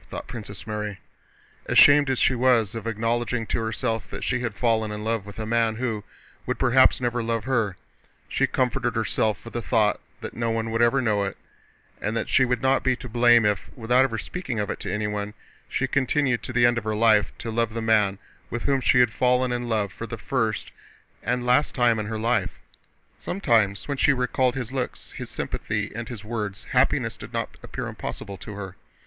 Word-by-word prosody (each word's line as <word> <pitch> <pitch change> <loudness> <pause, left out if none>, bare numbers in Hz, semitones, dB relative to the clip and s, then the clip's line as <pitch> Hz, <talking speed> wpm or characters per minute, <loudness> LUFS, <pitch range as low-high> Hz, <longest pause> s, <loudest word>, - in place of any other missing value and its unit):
thought - - -6
Princess 110 -4 -8
Mary. 105 -2 -4 0.7
Ashamed 145 -1 +7
as 130 - +1
she 130 - +3
was 120 -4 +3
of 115 -1 -5
acknowledging 115 +1 -1
to - - -1
herself 115 -1 -2
that - - -6
she - - 0
had 120 -4 -3
fallen 110 -2 +1
in 105 0 -5
love 110 -2 -1
with 100 - -10
a 110 - -3
man 115 0 +1
who 115 -3 -2 0.4
would - - -1
perhaps 130 +1 +5
never 120 -1 -1
love 115 -1 -1
her, 115 -8 0 0.5
she - - +1
comforted - - 0
herself 110 -1 0
with 115 - -9
the 120 - -2
thought 110 -4 +2 0.2
that - - -6
no 115 0 -1
one 115 0 -1
would 115 +1 0
ever 130 +3 +3
know 105 -3 +2
it 100 - -4 0.6
and 110 +2 -1
that 115 - -2
she 130 - +4
would 125 0 -1
not 135 0 +3
be 130 -1 +2
to 125 - -9
blame 120 -1 +5
if, 105 -2 0
without 125 +2 +3
ever 115 -4 -1
speaking 160 -3 -4
of 105 -2 -1
it - - -5
to - - -4
anyone, 105 -1 -2 0.3
she - - 0
continued 135 -2 +1
to - - -6
the 120 -1 +4
end 120 -1 +3
of - - -13
her 110 0 -1
life 110 -1 +4
to 115 - -5
love 115 0 0
the - - -1
man 110 -3 +2 0.3
with 120 0 -4
whom 135 -1 +1
she 125 - +5
had 120 -3 +3
fallen 125 +1 +2
in 120 0 -2
love 105 -5 0
for - - -6
the - - -6
first - - -1 0.5
and 125 0 -1
last 125 +4 +3
time 120 -4 +3
in 105 - -3
her 110 0 -3
life. 115 -3 0 0.6
Sometimes 115 - +1
when 140 -1 -2
she 145 - +4
recalled 125 0 +1
his 125 -3 -4
looks, 130 -2 -4
his - - -7
sympathy, - - -3
and 115 0 -5
his 110 -4 -8
words, 105 -3 -4
happiness - - +2
did - - -10
not - - -3
appear - - -5
impossible 100 -1 -6
to 105 +4 -9
her. 95 -2 -7
115 Hz, 210 wpm, -25 LUFS, 110-125 Hz, 0.7 s, Ashamed